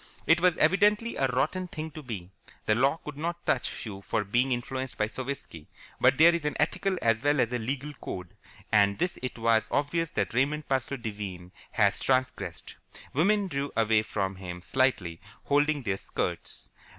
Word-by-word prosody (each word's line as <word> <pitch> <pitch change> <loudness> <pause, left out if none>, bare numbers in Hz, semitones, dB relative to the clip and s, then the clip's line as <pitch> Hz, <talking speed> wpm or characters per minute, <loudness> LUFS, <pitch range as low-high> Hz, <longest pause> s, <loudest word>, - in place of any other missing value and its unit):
It 170 +1 +4
was 180 -2 +4
evidently 210 +7 +3
a 135 - +2
rotten 155 +9 0
thing 160 -2 -6
to 155 - -8
be. 100 -9 -7 0.3
The 110 - +3
law 135 +7 +3
could 150 -1 -7
not 170 +2 -3
touch 125 - -1
you 100 -3 -7
for 105 +2 -1
being 120 +6 +1
influenced 130 +1 -3
by 105 - +2
Sovietski, 110 - -6 0.3
but - - +4
there 170 +2 +7
is 170 -2 -1
an 150 - -1
ethical 195 -2 +1
as 115 -1 +3
well 145 +1 +2
as 120 -1 +1
a 125 - 0
legal 135 +6 -3
code, 90 -2 -6 0.4
and 100 -1 +4
this 180 - -1
it 125 -1 -4
was 115 -1 +2
obvious 155 +3 0
that - - -1
Raymond 145 +5 0
Parsloe 135 +1 -1
Devine 100 -6 -6 0.2
had - - +3
transgressed. 130 -1 -1 0.4
Women 200 +7 +3
drew 140 -4 -3
away 110 -1 +4
from 95 -3 -3
him 90 -2 -7
slightly, 110 -12 0 0.2
holding 145 0 +2
their 100 -4 -1
skirts. - - -4
130 Hz, 175 wpm, -28 LUFS, 110-150 Hz, 0.4 s, there